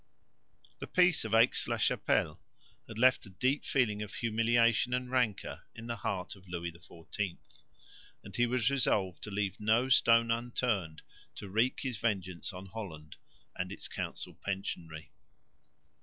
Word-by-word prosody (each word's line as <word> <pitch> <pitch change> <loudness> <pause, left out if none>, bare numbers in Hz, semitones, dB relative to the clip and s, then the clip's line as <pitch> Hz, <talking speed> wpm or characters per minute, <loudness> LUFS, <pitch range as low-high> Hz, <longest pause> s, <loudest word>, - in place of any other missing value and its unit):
The - - -6
peace 180 -2 +4
of 110 0 +1
Aix 115 +3 +4
la - - 0
Chapelle - - +1 0.5
had 110 - -9
left 125 -1 +4
a - - -11
deep 130 +9 0
feeling 110 -6 +1
of 105 0 -6
humiliation 115 +1 +2
and 125 0 -3
rancour 125 -6 0
in 115 - -9
the 115 0 -4
heart 95 -1 -3
of 95 -1 -18
Louis 85 -1 -3
XIV; 85 +2 -6 0.9
and 100 -1 -10
he 120 +3 +3
was 125 0 +1
resolved 100 -9 +1
to - - -7
leave 100 -2 -2
no 110 +5 +2
stone 115 -2 +5
unturned 115 -8 -1 0.3
to 100 - -7
wreak 115 +6 +1
his 125 -5 -3
vengeance 95 -6 -2
on 95 0 -8
Holland 90 -7 -8 0.4
and - - -3
its - - -4
council - - -5
pensionary. 85 -5 -5
110 Hz, 150 wpm, -32 LUFS, 95-120 Hz, 0.9 s, stone